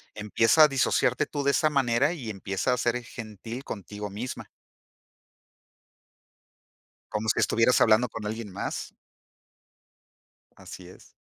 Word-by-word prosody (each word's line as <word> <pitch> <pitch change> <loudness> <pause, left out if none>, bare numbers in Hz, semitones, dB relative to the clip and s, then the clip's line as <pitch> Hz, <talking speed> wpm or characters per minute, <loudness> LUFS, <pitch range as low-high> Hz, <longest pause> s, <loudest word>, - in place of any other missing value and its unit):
empieza 115 +8 +4
a - - +8
disociarte 130 -2 +1
tú 145 -2 -3
de 140 - +3
esa 155 - +2
manera 135 0 +2
y 120 -10 -6
empieza 100 +5 -2
a - - 0
ser 120 0 0
gentil 115 +2 -8
contigo 105 -1 -7
misma. 115 +6 -6 2.6
Como 105 +1 -2
si - - +2
estuvieras 115 +2 +3
hablando 110 +3 +5
con 110 0 -7
alguien 110 -1 -5
más. - - -5 1.6
Así 90 -2 -11
es. 90 - -16
115 Hz, 125 wpm, -27 LUFS, 105-125 Hz, 2.6 s, a